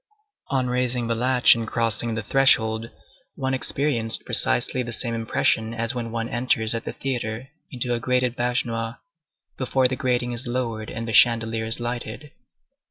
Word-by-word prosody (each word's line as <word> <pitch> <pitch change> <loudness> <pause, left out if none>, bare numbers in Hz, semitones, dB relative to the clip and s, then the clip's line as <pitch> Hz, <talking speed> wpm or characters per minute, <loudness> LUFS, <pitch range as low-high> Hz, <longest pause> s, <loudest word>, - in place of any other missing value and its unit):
On 130 -2 0
raising 125 -1 0
the 115 - 0
latch 125 +2 +4
and 115 -1 -4
crossing 115 0 0
the 115 - -4
threshold, 110 -2 +2 0.5
one 130 0 -2
experienced 130 -4 0
precisely - - +3
the 120 -1 -5
same 115 0 -2
impression 115 0 0
as 115 +1 -1
when 120 -2 -4
one 115 0 -3
enters 120 -2 0
at 115 - -4
the - - -5
theatre 120 -2 -4 0.2
into 125 -2 -2
a 120 - -1
grated 125 0 0
baignoire, 120 -1 -2 0.6
before 130 0 +2
the 130 - -3
grating 125 -2 -1
is 120 +1 0
lowered 115 -3 -3
and 115 0 -5
the 115 - -3
chandelier 115 0 +4
is 110 +2 -1
lighted. 120 +3 -5
120 Hz, 165 wpm, -23 LUFS, 115-125 Hz, 0.6 s, latch